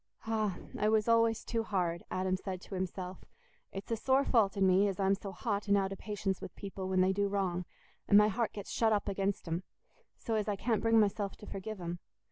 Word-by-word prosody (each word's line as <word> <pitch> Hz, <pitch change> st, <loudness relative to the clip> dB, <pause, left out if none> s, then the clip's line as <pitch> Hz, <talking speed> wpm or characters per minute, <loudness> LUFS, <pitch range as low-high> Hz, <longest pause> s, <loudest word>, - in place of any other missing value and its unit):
"Ah! 215 Hz, -4 st, 0 dB, 0.2 s
I 210 Hz, -, +3 dB
was 220 Hz, 0 st, +2 dB
always 230 Hz, -1 st, +3 dB
too 230 Hz, -1 st, 0 dB
hard," 180 Hz, -6 st, -1 dB
Adam 185 Hz, 0 st, 0 dB
said 185 Hz, -1 st, -5 dB
to -, -, -11 dB
himself. 185 Hz, 0 st, -4 dB, 0.5 s
"It's 195 Hz, +4 st, -7 dB
a -, -, +3 dB
sore 265 Hz, +4 st, +2 dB
fault 215 Hz, -4 st, +3 dB
in 195 Hz, -, +4 dB
me 190 Hz, +2 st, +5 dB
as 195 Hz, -1 st, -3 dB
I'm 195 Hz, 0 st, +3 dB
so 200 Hz, 0 st, -4 dB
hot 200 Hz, +3 st, -2 dB
and 200 Hz, 0 st, +4 dB
out 195 Hz, 0 st, 0 dB
o' -, -, -5 dB
patience 195 Hz, -2 st, -3 dB
with -, -, -8 dB
people 195 Hz, -2 st, -5 dB
when 185 Hz, -1 st, +3 dB
they 190 Hz, +1 st, +3 dB
do 200 Hz, +1 st, +1 dB
wrong, 185 Hz, -3 st, -1 dB, 0.4 s
and 205 Hz, -, +7 dB
my 210 Hz, 0 st, +7 dB
heart 225 Hz, +2 st, 0 dB
gets 205 Hz, -2 st, -7 dB
shut 225 Hz, -1 st, +2 dB
up 210 Hz, -2 st, +1 dB
against 195 Hz, -1 st, -1 dB
'em, 165 Hz, +2 st, -1 dB, 0.6 s
so 230 Hz, -, -3 dB
as 215 Hz, -1 st, 0 dB
I 205 Hz, -, 0 dB
can't 225 Hz, +2 st, 0 dB
bring 225 Hz, 0 st, +4 dB
myself 200 Hz, -1 st, 0 dB
to -, -, -11 dB
forgive 205 Hz, +1 st, -6 dB
'em. 175 Hz, 0 st, -4 dB
200 Hz, 230 wpm, -32 LUFS, 190-215 Hz, 0.6 s, and